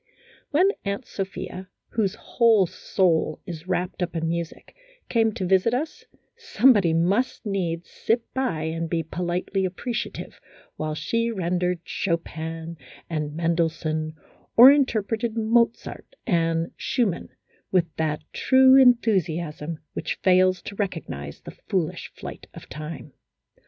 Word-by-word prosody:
When 350 +6 +4
Aunt 200 +5 -3
Sophia, 190 -1 -6 0.2
whose 205 -4 0
whole 225 -5 +3
soul 165 -3 0
is 170 -1 -8
wrapped 185 0 -2
up 175 -1 -2
in 165 0 -1
music, 170 0 -5 0.3
came 225 -2 +3
to 190 - -3
visit 190 +6 +3
us, 310 +5 -4 0.3
somebody 245 - +4
must 190 +11 +1
needs 175 -4 -2
sit 230 +1 0
by 250 -13 -1
and 165 +1 -3
be 165 -1 0
politely 180 +4 -2
appreciative 220 +7 -4 0.3
while 155 0 -3
she 230 +8 -1
rendered 180 -3 -1
Chopin 165 -2 -3 0.3
and 150 -2 -2
Mendelssohn, 160 -2 -1 0.4
or 250 +4 +11
interpreted 230 -4 0
Mozart 230 - 0
and 165 -4 +1
Schumann 225 -9 -1 0.4
with 170 -4 +1
that 155 -1 -1
true 260 0 +6
enthusiasm 175 - +2
which - - -3
fails 185 0 +4
to 200 - -7
recognize 165 - -4
the - - -9 0.2
foolish 180 -2 -1
flight - - -9
of - - -11
time. 150 -2 -8
180 Hz, 120 wpm, -24 LUFS, 165-225 Hz, 0.4 s, or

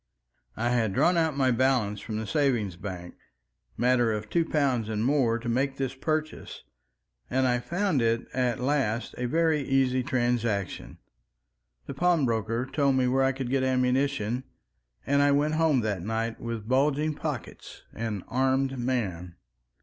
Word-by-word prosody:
I 120 - 0
had 115 -5 +1
drawn 175 - +3
out 160 -4 +1
my 130 -2 +3
balance 120 -5 +1
from 110 0 -5
the 110 - -3
savings 120 - 0
bank, 90 -2 -7 0.6
matter 120 -2 +3
of 105 0 -4
two 170 - +3
pounds 135 -8 0
and 110 0 -1
more, 130 -4 +2
to 120 +1 -7
make 135 +3 0
this 135 -2 -2
purchase, 155 +3 -3 0.7
and 130 +1 +1
I 125 -1 +2
found 175 +1 0
it 115 0 +1
at 125 0 0
last 125 -4 -1
a 125 - -1
very 160 +1 +2
easy 130 -1 +1
transaction. 120 -6 -1 0.9
The - - -6
pawnbroker 120 -9 +1
told 135 0 +1
me 130 -1 +2
where 135 +2 +2
I 135 - +3
could 130 -2 -5
get 135 -1 +2
ammunition, 130 -2 0 0.6
and 140 +1 +2
I 145 0 +4
went 150 +2 +2
home 155 -5 +3
that 105 -5 -2
night 115 +3 -3
with 115 -2 -5
bulging 145 +4 +2
pockets, 145 -5 -6
an 110 -4 -4
armed 130 +1 0
man. 95 -9 -2
125 Hz, 155 wpm, -27 LUFS, 115-140 Hz, 0.9 s, I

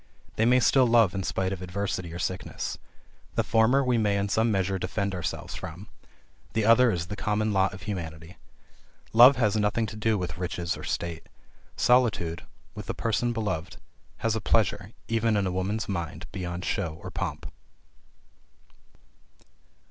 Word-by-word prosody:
These 110 - +2
may 125 +1 +5
still 130 +1 +4
love 115 -5 +4
in 95 - -2
spite 95 0 -1
of 95 - -6
adversity 90 -1 -3
or 85 - -6
sickness. 90 +1 -4 0.6
The - - +2
former 115 +5 +3
we 125 -2 +2
may 105 -2 +2
in 100 0 -1
some 110 +3 +2
measure 95 -1 0
defend 100 +2 -2
ourselves 90 -3 -4
from; 90 +6 -8 0.6
the 110 -1 +1
other 120 +2 +6
is 85 -6 -1
the 90 - -6
common 105 +1 0
lot 95 0 +3
of 95 -1 -10
humanity. 80 -4 -6 0.8
Love 125 +5 +9
has 110 -5 +1
nothing 105 +2 +1
to 105 - -7
do 110 0 +1
with 90 -1 -4
riches 90 -1 -2
or - - -9
state. 85 -2 -4 0.5
Solitude, 110 -10 +2 0.3
with - - -8
the - - -3
person 115 +2 0
beloved, 105 -8 -3 0.4
has 115 -1 0
a 110 - -2
pleasure, 105 -2 +1 0.2
even 115 -1 +1
in 100 - +1
a 95 - -1
woman's 95 +4 -2
mind, 85 -6 -4
beyond 90 0 -5
show 80 -1 -2
or - - -6
pomp. - - -4
100 Hz, 165 wpm, -27 LUFS, 90-110 Hz, 0.8 s, Love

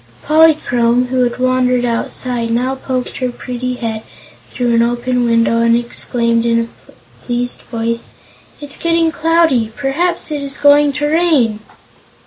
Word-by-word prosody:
Polychrome, 250 -6 +3
who 255 0 0
had 240 - -3
wandered 255 -1 +1
outside, 235 0 -2
now 250 +3 0
poked 260 -1 -4
her 255 -1 -1
pretty 250 +1 -5
head 225 -3 -4 0.5
through 245 -2 -1
an 230 - +3
open 240 +1 0
window 230 0 +2
and 230 0 +3
exclaimed 235 -1 -1
in 230 0 +2
a 230 - -11 0.3
pleased 245 0 -2
voice: 230 0 -3 0.5
"It's 290 -1 -6
getting 330 -1 +1
cloudy. 320 -9 +2
Perhaps 310 +5 -1
it 295 -1 -2
is 280 0 -2
going 290 0 +5
to 290 +2 -2
rain!" 295 -9 +2
250 Hz, 140 wpm, -15 LUFS, 235-285 Hz, 0.5 s, going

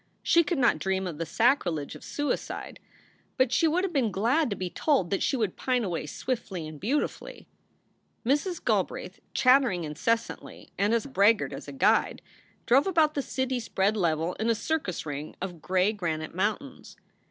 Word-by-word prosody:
She 335 - +5
could 330 +1 -1
not 245 -3 +3
dream 190 0 -1
of 165 -4 -5
the 165 - -3
sacrilege 180 - +1
of - - -11
suicide, 290 0 -3 0.6
but 260 -2 +3
she 325 +6 +3
would 345 +4 +1
have 380 -3 -2
been 250 -7 +1
glad 245 +10 +1
to 200 - -2
be 185 - -3
told 200 - 0
that 195 - 0
she 270 - +1
would 215 -6 -1
pine 250 -2 0
away 170 -6 -3
swiftly 190 - -4
and 155 -1 -9
beautifully. 265 - -2 0.8
Mrs. 295 +8 0
Galbraith, - - -1 0.2
chattering 255 -9 +4
incessantly 225 +10 -3
and 210 +3 +2
as 230 - 0
braggart 225 -5 +3
as - - -8
a - - -6
guide, 200 +11 +2 0.4
drove 270 +8 +4
about 320 -5 +3
the 285 - -1
city 260 -1 -2
spread 210 -2 0
level 170 -3 0
in 220 +2 0
a 230 - +3
circus 225 - -2
ring 145 0 -5
of 180 -3 -6
gray 185 +4 +2
granite 160 -6 -3
mountains. 215 +9 -3
220 Hz, 175 wpm, -27 LUFS, 180-270 Hz, 0.8 s, She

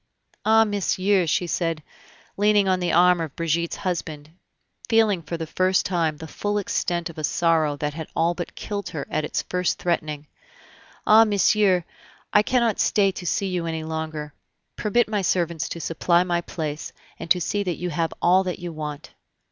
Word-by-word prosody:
"Ah! 220 +1 +5
monsieur," 200 -2 +1
she 155 +4 +1
said, 165 -2 -2 0.5
leaning 205 -1 +3
on 185 -1 +2
the 175 -1 0
arm 180 0 +5
of 155 -4 -5
Brigitte's 170 0 -1
husband, 160 -5 -4 0.6
feeling 220 -5 +3
for 170 +1 -5
the 165 - -4
first 185 +3 +1
time 165 -4 0
the 160 0 -8
full 205 +6 -2
extent 175 -4 -1
of 160 - -11
a - - -5
sorrow 160 -2 +2
that 150 0 -2
had 160 0 -6
all 170 +1 +2
but 175 -1 -6
killed 205 -1 -5
her 150 -5 -5
at 155 - 0
its - - -2
first 180 -1 -1
threatening; 155 -4 -2 0.8
"ah! 220 +1 +7
monsieur, 205 -3 +3 0.5
I 210 - +7
cannot 235 -1 +1
stay 195 -2 +3
to 180 -1 -7
see 195 +3 0
you 175 -2 -2
any 160 -1 -3
longer... 155 -2 -5 0.4
permit 225 +3 +1
my 210 -2 -1
servants 170 -5 0
to 170 - -5
supply 170 +2 +2
my 175 -1 0
place, 155 -3 -5 0.3
and 165 - -7
to 180 +2 +4
see 205 +4 -1
that 180 -4 -2
you 180 0 -3
have 165 +1 -1
all 185 +2 +5
that 180 - -3
you 175 -2 -6
want." 150 -1 -6
175 Hz, 180 wpm, -24 LUFS, 160-195 Hz, 0.8 s, ah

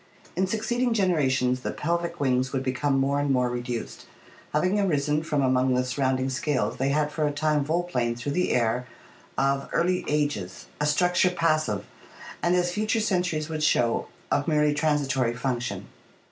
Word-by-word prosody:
In 190 +2 +1
succeeding 235 +4 0
generations 135 - +2
the - - -4
pelvic 170 +1 -2
wings 130 -1 +1
would 135 -1 -1
become 135 +2 0
more 140 +1 +1
and 145 0 0
more 125 -2 +2
reduced. 120 -1 -5 0.4
Having 185 +7 +1
arisen 150 -5 +1
from 150 -3 0
among 130 0 +2
the 125 0 +1
surrounding 130 0 0
scales, 130 0 -1
they 135 +1 0
had 150 +1 +1
for 150 0 0
a - - 0
time 150 0 +1
volplaned 140 -7 -1
through 130 +4 -3
the 180 +5 +1
air 125 +1 +1 0.5
of 135 0 +1
early 180 +2 +1
ages, 145 -12 -2
a 150 - +1
structure 180 +4 +3
passive, 155 - 0 0.6
and, 175 +1 +2
as 175 0 +1
future 215 +4 0
centuries 180 -7 0
would 155 -1 -4
show, 120 -6 +2 0.2
of 145 +1 +1
merely 150 -2 +3
transitory 140 -5 +1
function. 125 -1 -3
145 Hz, 160 wpm, -26 LUFS, 130-170 Hz, 0.6 s, structure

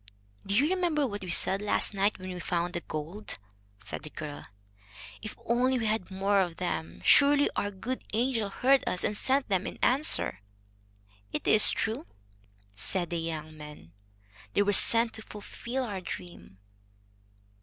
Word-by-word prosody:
"Do 200 - 0
you 280 +7 +4
remember 340 -6 +1
what 205 -5 -5
we 185 - -7
said 190 +2 +3
last 210 0 0
night 200 +1 +1
when 185 -1 -7
we 180 - -7
found 175 0 -2
the 175 - -3
gold 165 +9 -7
piece?" - - -3 0.5
said - - -4
the 155 - -9
girl. 150 -1 -8 0.7
"If 215 - -7
only 255 +2 +2
we 230 - -2
had 215 -3 -1
more 195 +1 +1
of 175 -3 -3
them! 175 -3 -4
Surely 285 0 +5
our 205 - -1
good 230 +6 -5
angel 230 -2 0
heard 265 +6 +3
us, 180 - -1
and 210 - 0
sent 265 +5 +1
them 190 -2 0
in - - -7
answer." 255 - +2 0.9
"It - - -4
is 215 - +8
true," 230 +8 -1 0.7
said 175 - -1
the 170 - -1
young 155 -1 -5
man. 150 - -12 0.6
"They 205 - +3
were 205 0 +1
sent 230 +3 +6
to 220 - -7
fulfil 235 +5 -6
our 200 -6 -5
dream." 170 - -9
205 Hz, 165 wpm, -29 LUFS, 175-240 Hz, 0.9 s, is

